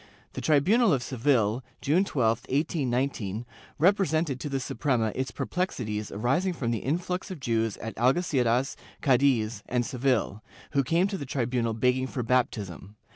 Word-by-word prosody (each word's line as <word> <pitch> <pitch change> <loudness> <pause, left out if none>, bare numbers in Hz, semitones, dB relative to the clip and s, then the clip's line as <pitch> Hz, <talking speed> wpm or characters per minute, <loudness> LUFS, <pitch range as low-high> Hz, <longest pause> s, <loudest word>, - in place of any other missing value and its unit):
The - - -5
tribunal 185 - +4
of 130 -3 0
Seville, 125 -3 +1 0.2
June 155 +7 +2
12, 115 - +1
1819, 130 - -1 0.3
represented 160 -5 +2
to 150 - -4
the 135 -1 -1
Suprema 120 -3 0
its 130 0 -2
perplexities 110 - -3
arising 135 - 0
from 120 -8 -2
the 115 - -1
influx 180 +7 -2
of 185 -4 -6
Jews 115 -4 0
at 110 -2 -6
Algeciras, 130 -1 +2 0.3
Cadiz 125 -5 +2
and 120 -1 +1
Seville, 125 -5 0 0.3
who 140 -2 +2
came 165 +7 +2
to 195 -1 -3
the 140 - -5
tribunal 120 -3 -1
begging 125 +3 +1
for 130 -2 -3
baptism. 105 -6 -1
130 Hz, 145 wpm, -27 LUFS, 115-150 Hz, 0.3 s, tribunal